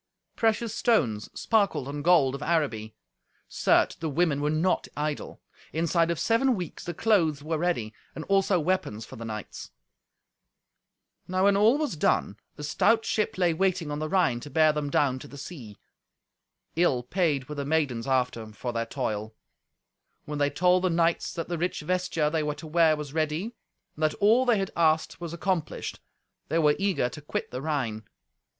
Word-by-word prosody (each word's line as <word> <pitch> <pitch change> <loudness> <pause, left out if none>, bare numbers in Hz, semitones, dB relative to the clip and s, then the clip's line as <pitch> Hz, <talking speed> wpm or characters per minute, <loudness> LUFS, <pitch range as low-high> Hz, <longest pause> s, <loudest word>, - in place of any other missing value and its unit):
Precious 225 -1 +1
stones 120 - +1
sparkled 200 - +1
on 145 +1 -4
gold 155 -5 +4
of 140 - -6
Araby. 135 -10 -1 0.5
Certes, - - +2
the 160 - -4
women 150 -1 +1
were 150 - +1
not 160 +4 +1
idle. 150 0 -4 0.3
Inside 165 +1 +1
of 170 - 0
seven 245 +3 +2
weeks 180 -5 -6
the 175 - -5
clothes 165 -10 +2
were 155 0 -2
ready, 150 -11 -1 0.2
and 160 - -5
also 195 -1 +2
weapons 150 - -1
for - - -11
the 115 - -7
knights. 110 -2 -7 1.6
Now 185 +1 0
when 200 0 +5
all 215 +7 +5
was 300 - -2
done, 105 -8 +1 0.2
a 150 - -7
stout 225 +9 +2
ship 215 -3 -1
lay 175 -3 +2
waiting 180 -3 0
on 145 - -3
the 155 0 -3
Rhine 175 -11 +2
to 145 - -9
bear 155 +1 +4
them 150 -1 -2
down 135 -2 +1
to 145 - -10
the 140 - -12
sea. 130 - -9 1.0
Ill 150 -7 +2
paid 145 -2 0
were 150 - -6
the 145 -1 -3
maidens, 140 -5 0
after, 125 -4 0
for 120 +3 -5
their 115 0 -2
toil. 110 -5 -3 0.9
When 150 -1 -4
they 145 0 +3
told 180 +5 +2
the 185 - +3
knights 165 0 +1
that 165 -2 -4
the 175 -2 -3
rich 175 0 -1
vesture 165 -2 0
they 160 -1 +1
were 150 -1 -2
to 145 - -10
wear 160 0 +4
was 150 -2 -7
ready, 160 +8 -1 0.4
and 155 - -11
that 155 -1 +2
all 225 +5 +4
they 235 -3 +4
had 195 -1 -2
asked 160 0 +1
was 170 -2 -5
accomplished, 170 -1 -3 0.5
they 160 - 0
were 150 -2 +4
eager 195 -10 +1
to 150 - -10
quit 145 - -4
the 125 - -4
Rhine. 130 -8 -2
155 Hz, 180 wpm, -27 LUFS, 140-180 Hz, 1.6 s, when